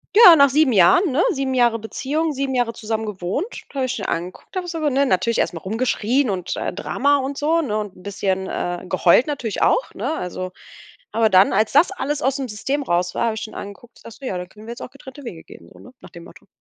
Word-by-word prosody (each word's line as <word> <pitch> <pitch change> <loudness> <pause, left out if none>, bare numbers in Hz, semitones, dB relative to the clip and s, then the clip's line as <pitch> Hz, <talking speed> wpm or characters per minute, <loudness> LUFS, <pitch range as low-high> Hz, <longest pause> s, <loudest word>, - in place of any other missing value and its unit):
Ja, 410 -6 +10
nach 280 -2 +6
7 280 -1 +3
Jahren, 225 - +5
ne, 275 +6 +2
7 270 -5 -2
Jahre 240 -2 +3
Beziehung, 290 +8 -2
7 270 -1 -2
Jahre 240 -2 0
zusammen 220 0 -3
gewohnt, 200 - -3 0.3
habe 265 -1 0
ich 250 - -3
ihn 200 - -5
angeguckt 180 - -5
einfach 360 -1 -3
so 335 -1 -4
ne 275 +1 +2
natürlich 230 0 +1
erst - - +1
mal 165 - -6
rumgeschrien 230 - 0
und, 180 -2 -3
äh, - - -3
Drama 280 +9 +1
und 275 +1 -4
so, 320 +3 +2
ne 220 -9 -2
und 210 -3 -5
'n - - -16
bisschen, 190 -1 -2
äh 175 +1 -4
geheult 180 - +4
natürlich 255 -8 -3
auch, - - +2
ne? - - -3
Also, 185 - -5 0.6
aber 225 -1 +2
dann, 190 0 +5
als 215 +3 +1
das 300 +7 +5
alles 295 -6 -3
ausm 270 0 0
System 265 +7 -2
raus 175 -5 0
war, 235 - +1
hab 225 - 0
ich 220 - -5
schon 220 - -7
angeguckt, 205 +4 -10
ich - - -21
sag 230 - -10
so: 235 +5 -12
„Ja, 190 - -2
dann 180 0 -8
können 215 +2 -15
wir - - -5
jetzt 240 - -12
auch - - -7
getrennte 275 0 -12
Wege 165 -8 -8
gehen.“ - - -15
So - - -17
ne 250 - -15
nach - - -13
dem 170 -2 -11
Motto. 170 -2 -16
235 Hz, 245 wpm, -21 LUFS, 195-280 Hz, 0.6 s, Ja